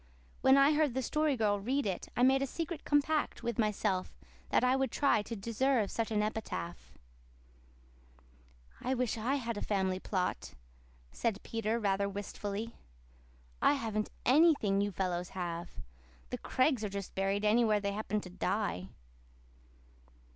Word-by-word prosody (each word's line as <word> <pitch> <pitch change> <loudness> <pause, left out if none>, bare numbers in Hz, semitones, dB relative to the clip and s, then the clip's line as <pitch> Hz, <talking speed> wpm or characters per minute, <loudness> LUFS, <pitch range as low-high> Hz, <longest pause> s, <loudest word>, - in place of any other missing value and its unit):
When 265 +1 +6
I 275 +2 +6
heard 295 -4 +2
the 260 - 0
Story 300 0 +1
Girl 205 -2 +2
read 260 +7 0
it 190 -3 -3
I 245 - +3
made 265 +1 +5
a 275 - 0
secret 330 +3 -4
compact 290 -2 +1
with 235 -2 -2
myself 210 -3 0 0.3
that - - +3
I 250 +1 +4
would 270 0 +1
try 275 -7 +2
to 230 +2 -6
deserve 230 +1 +1
such 230 -1 -1
an 210 -1 +1
epitaph. 215 -5 -4 1.9
"I 260 +2 0
wish 250 -2 0
I 235 +5 0
had 235 -5 -3
a - - -4
family 190 -2 0
plot," 180 - -2 0.6
said 225 -4 -1
Peter, 225 0 -1
rather 200 -2 +1
wistfully. 205 +2 -5 0.9
"I - - +5
haven't 220 -6 -2 0.2
ANYTHING 260 -8 +4
you 205 0 0
fellows 180 -2 -2
have. 170 -1 -3 0.6
The - - -3
Craigs 255 -3 +1
are 210 - -1
just 200 -1 -6
buried 195 +2 0
anywhere 215 -1 +4
they 200 0 -1
happen 210 0 -2
to 180 - -9
die." 185 - -1
220 Hz, 150 wpm, -32 LUFS, 200-260 Hz, 1.9 s, When